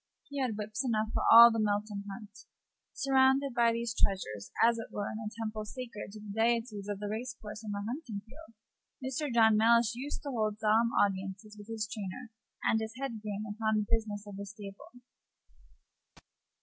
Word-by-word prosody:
He 285 -1 -3
had 240 -5 -1
whips 215 +3 -3
enough 220 -4 0
for - - 0
half 235 0 +11
the 225 - -1
Melton 205 -1 -1
Hunt. 210 +1 -9 0.6
Surrounded 270 0 +3
by 235 -1 +4
these 235 0 -2
treasures, 105 - -1 0.2
as 230 0 +3
it 225 - -6
were 205 - -3
in 215 - -5
a 215 -1 -4
temple 215 -1 -3
sacred 225 -3 -7
to 215 - -9
the 205 -1 -8
deities 230 -3 0
of 205 - -2
the 205 - -4
race 240 +4 -4
course 210 +1 -8
and 210 - -5
the 200 0 -3
hunting 235 -5 -5
field, 265 0 -15 0.5
Mr. 270 +2 -2
John 220 -2 +5
Mellish 230 +1 +4
used 265 +5 -5
to 285 - -4
hold 215 -4 -1
solemn 220 +2 +3
audiences 195 +2 -1
with 205 0 -12
his 220 -2 -3
trainer 220 +2 -6 0.3
and 220 - +3
his 220 +1 -5
head 250 -6 -4
groom 210 -1 -4
upon 220 +1 -1
the 210 - 0
business 215 -2 -1
of 205 -1 -9
the 200 - -5
stable. 210 +4 -11
220 Hz, 190 wpm, -31 LUFS, 210-235 Hz, 0.6 s, half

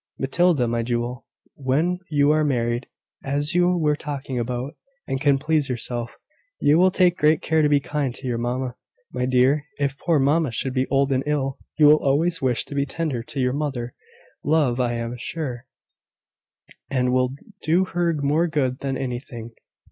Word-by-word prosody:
Matilda, 145 -1 +2
my 115 0 0
jewel, 120 +1 -3 0.3
when 150 +7 0
you 145 -1 +3
are 155 0 +3
married, 120 -3 0 0.4
as 145 +3 -1
you 180 0 +3
were 150 -3 +2
talking 140 -4 -4
about, 125 +5 -3 0.3
and 135 -1 -3
can 140 -1 +4
please 150 0 0
yourself, 120 -1 -3 0.4
you 150 +3 +4
will 185 +1 +6
take 180 -1 +2
great 155 +2 +3
care 160 -1 +2
to 150 - +3
be 145 -1 +4
kind 140 -3 -2
to 135 - -10
your 120 -2 -1
mamma, 125 +1 -2 0.4
my 125 - -1
dear, 130 +4 +3
if 140 -1 -2
poor 170 -3 +2
mamma 145 +2 +2
should 125 +3 -2
be 130 0 0
old 140 0 +2
and 130 -1 +2
ill. 135 -3 -1 0.2
You 155 - +6
will 150 +1 +7
always 165 +5 +1
wish 125 -3 +1
to - - -9
be 140 0 +1
tender 150 -5 -2
to 135 +4 -7
your 125 -1 +1
mother, 135 -5 -3 0.5
love, 145 -5 +2
I 120 -1 +1
am 115 +1 -4
sure; 130 -4 -4 1.2
and 125 -2 +1
that - - +1
will 130 +1 +1 0.3
do 175 +4 +2
her 175 -2 0
more 155 +5 +2
good 135 -5 -1
than 135 -1 -2
anything." 120 -2 -5
140 Hz, 180 wpm, -23 LUFS, 125-150 Hz, 1.2 s, will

